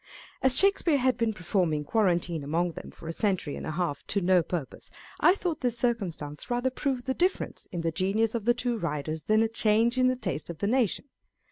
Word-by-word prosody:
As 265 -1 +5
Shakespeare 390 -6 +4
had 255 -2 +2
been 230 -2 0
performing 175 -6 -1
quarantine 175 -4 0
among 170 +5 0
them - - -9
for 165 - -12
a 165 - -3
century 185 -7 -1
and - - -6
a - - -3
half 170 -4 -2
to 200 - +1
no 185 -1 +4
purpose, 165 -4 -6 0.3
I 360 - +5
thought 340 -6 -3
this 245 -2 +1
circumstance 185 - -2
rather 245 +2 0
proved 260 -2 -2
the 260 - 0
difference 365 +6 -1
in 175 - -3
the 165 0 -1
genius 200 +6 0
of 230 -3 -3
the 240 0 +4
two 245 -2 -2
writers 155 -2 -3
than 215 +1 +3
a - - +2
change 225 +2 +2
in 255 - +4
the 255 - +2
taste 185 -11 -4
of 170 - -6
the 200 - -2
nation. 235 0 +1
215 Hz, 215 wpm, -28 LUFS, 170-245 Hz, 0.3 s, As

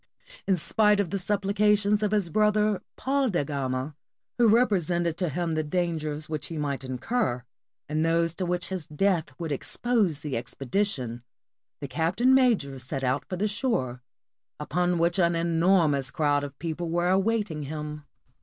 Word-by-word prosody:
In 190 -2 +3
spite 210 +4 +3
of 190 -5 0
the 200 - 0
suppHcations 205 +2 +2
of 210 - +1
his 200 -5 0
brother, 210 -1 +2
Paul 270 -1 0
da 175 -7 0
Gama, 135 0 -3 0.4
who 235 - +6
represented 180 -8 +2
to 180 -2 -1
him 170 +3 -2
the 155 0 0
dangers 155 -2 -2
which 155 -3 -4
he 165 - -6
might 140 -2 -2
incur, 130 - -2 0.4
and 155 +1 0
those 165 0 +2
to 185 0 -2
which 175 0 +1
his 185 -5 -4
death 170 +2 +1
would 165 -3 -4
expose 190 - 0
the 145 -3 -4
expedition, 125 - -2 0.6
the 140 - -4
captain 170 - +2
major 220 - +2
set 135 +1 -5
out 130 +2 0
for 185 - -2
the 200 +4 0
shore, 200 - -1 0.6
upon 180 +1 0
which 170 +2 +2
an 170 -1 +3
enormous 165 -4 +2
crowd 145 -1 +1
of 140 -1 -7
people 165 +1 -4
were 175 +1 +1
awaiting 195 -4 +1
him. 150 0 -6
170 Hz, 160 wpm, -27 LUFS, 150-200 Hz, 0.6 s, who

